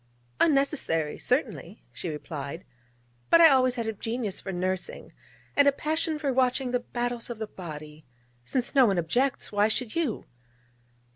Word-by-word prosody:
'Unnecessary 275 - +1
certainly,' - - -2
she 175 - -5
replied: 150 +1 -6 0.6
'but 335 - +7
I 330 -1 +9
always 255 -2 +3
had 235 -3 -2
a 220 - -2
genius 225 -1 -3
for 195 - -6
nursing, 185 +1 -3 0.4
and 285 0 +5
a - - +7
passion 310 +2 -1
for 285 -3 -1
watching 255 0 +1
the 250 - +1
battles 240 0 -4
of 240 - -5
the 220 - -3
body. 155 -6 -9 0.4
Since 245 - -2
no 265 -4 +6
one 195 -3 +1
objects, 245 +11 0
why 205 0 +3
should 220 +1 -2
you?' 315 -10 -1
240 Hz, 155 wpm, -27 LUFS, 180-265 Hz, 0.6 s, I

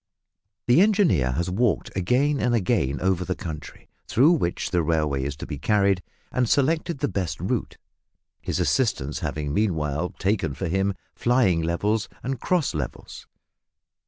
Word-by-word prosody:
The 125 +8 +5
engineer 190 - +3
has 85 +6 -1
walked 115 +4 0
again 130 +10 +1
and 120 -1 +2
again 95 - +1
over 95 -1 +1
the 90 +1 -2
country 80 -3 -8 0.2
through 140 +8 +5
which 135 - -1
the 90 -2 +2
railway 75 -4 0
is 70 +1 -3
to 70 - -7
be 75 -3 -6
carried 100 +1 +2 0.3
and 125 -3 0
selected 155 +3 +1
the - - 0
best 90 -6 -3
route, - - -2 0.6
his - - -2
assistants 100 - 0
having 75 -2 -3
meanwhile 80 -5 0
taken 95 -8 0
for 75 - -3
him 95 +3 0 0.2
"flying 120 -9 +2
levels" 100 +7 0
and 130 0 -3
"cross 175 -1 0
levels." 70 -6 -6
95 Hz, 150 wpm, -24 LUFS, 80-125 Hz, 0.6 s, The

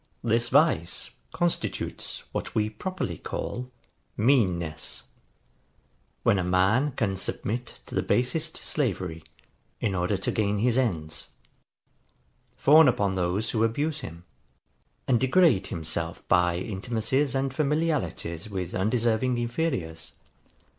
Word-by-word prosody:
This 115 +1 +1
vice 140 - +2 0.2
constitutes 175 -1 -2
what - - -4
we 110 0 +1
properly 185 - -4
call 125 +1 -4 0.5
MEANNESS; 90 - +1 1.2
when 100 - +4
a - - 0
man 95 +11 +2
can 100 -5 0
submit 115 +5 -4
to - - -12
the - - +2
basest 155 +6 0
slavery, 90 - -2 0.6
in 100 - 0
order 90 +2 0
to 95 - -1
gain 105 -1 +1
his 120 +3 +2
ends; 85 -12 -1 1.3
fawn 155 +2 +7
upon 100 -6 +2
those 95 +4 0
who 110 -1 +1
abuse 145 +7 0
him; 85 - -8 0.8
and 120 -3 +4
degrade 130 - +4
himself 80 0 -4
by 90 -1 +3
intimacies 115 +8 -1
and 135 0 0
familiarities 145 - -1
with 95 -3 -4
undeserving 115 +4 +1
inferiors. 120 - -2
110 Hz, 115 wpm, -27 LUFS, 90-130 Hz, 1.3 s, fawn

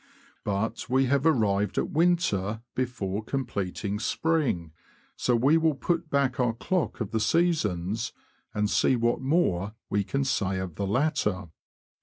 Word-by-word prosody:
But 105 +4 -2
we 130 +1 +3
have 140 +3 +2
arrived 105 -8 +2
at - - 0
winter 115 - +1
before 110 -5 -2
completing 105 -5 -3
spring, 140 - 0 0.4
so 125 - +1
we 135 +7 +4
will 160 -2 +2
put 170 +3 -1
back 140 -2 +1
our 120 -2 +2
clock 175 +8 -1
of 110 - -3
the 110 - 0
seasons, 110 - +1 0.4
and 105 0 0
see 130 - +3
what 120 +1 +1
more 115 - +1 0.2
we 100 - +2
can 135 +7 -1
say 100 -8 0
of 95 -2 -4
the 100 +4 -3
latter. 105 - 0
115 Hz, 145 wpm, -27 LUFS, 100-140 Hz, 0.4 s, we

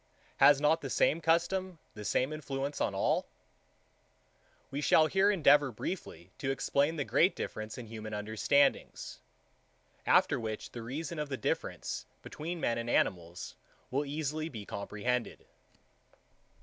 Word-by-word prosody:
Has 145 -1 +7
not 150 +2 +3
the 135 - -5
same 160 +5 +2
custom 175 +3 +1 0.2
the 105 - -8
same 130 +7 0
influence 140 -1 -4
on - - 0
all? - - +1 1.4
We 140 - -3
shall 155 +2 +5
here 195 +5 +3
endeavour 145 -7 +5
briefly 100 - -6
to 135 - -2
explain 140 +3 +1
the 145 -4 -2
great 180 +4 +3
difference 110 0 -5
in 125 - -7
human 110 -1 -7
understandings: 110 +7 +1 0.9
After - - +4
which 110 -2 -5
the 120 - -7
reason 150 +7 -5
of 150 -1 -3
the 135 - -3
difference - - -3 0.2
between 170 +3 -5
men 115 -6 0
and 115 0 -4
animals 85 -5 0 0.4
will 140 +3 +1
easily 155 +2 -3
be 110 -7 -8
comprehended. 105 +5 -3
140 Hz, 135 wpm, -31 LUFS, 115-155 Hz, 1.4 s, Has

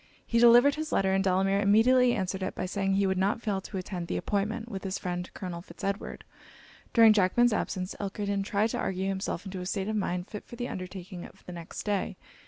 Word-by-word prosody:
He 230 - +1
delivered 240 +4 +7
his 310 +1 -4
letter, 190 -1 +2
and 195 0 +2
Delamere 195 +1 +2
immediately 240 +5 +5
answered 190 -1 -2
it 190 - -3
by - - -2
saying 195 +1 -1
he 200 0 +2
would 190 -1 +1
not 200 +4 +1
fail 200 -3 -1
to 190 - -7
attend 180 -2 -5
the - - -2
appointment, 215 +3 -2
with 195 -5 -6
his 190 0 -2
friend 180 -1 -4
Colonel 175 -2 -5
Fitz - - -13
Edward. 200 +1 -3 0.7
During 225 -2 +7
Jackman's 215 +4 +3
absence, 185 -3 -2
Elkerton 200 0 -2
tried 205 +3 0
to - - -2
argue 190 0 -1
himself 190 -1 -3
into 190 -1 -5
a - - -5
state 195 0 -2
of 220 - -1
mind 180 -3 -2
fit 210 - -7
for - - -11
the 245 +1 -4
undertaking 185 0 -7
of - - -14
the 180 - -8
next 170 -1 -7
day. 205 -2 -1
195 Hz, 220 wpm, -29 LUFS, 185-215 Hz, 0.7 s, delivered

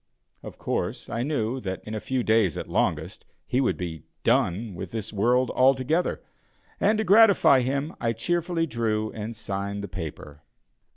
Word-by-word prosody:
Of - - -10
course, - - -3
I 115 - -2
knew 130 -3 -1
that 95 -2 -5
in 110 - -7
a 110 - -2
few 130 +2 -2
days 110 -7 +2
at - - -5
longest, - - -1 0.2
he 125 - +1
would 130 - +1
be 85 -3 -5 0.2
"done" 100 +4 +1
with 90 +1 -6
this 110 +1 -5
world 120 +5 +2
altogether, 135 +6 +2 0.6
and, 215 +2 +3
to 220 - +1
gratify 200 -9 +6
him, 140 +5 -1
I 115 -1 +1
cheerfully 170 +7 -1
drew 110 -5 -1
and 110 +1 -6
signed 100 -1 -4
the - - -4
paper. 75 -4 -8
115 Hz, 165 wpm, -26 LUFS, 100-135 Hz, 0.6 s, gratify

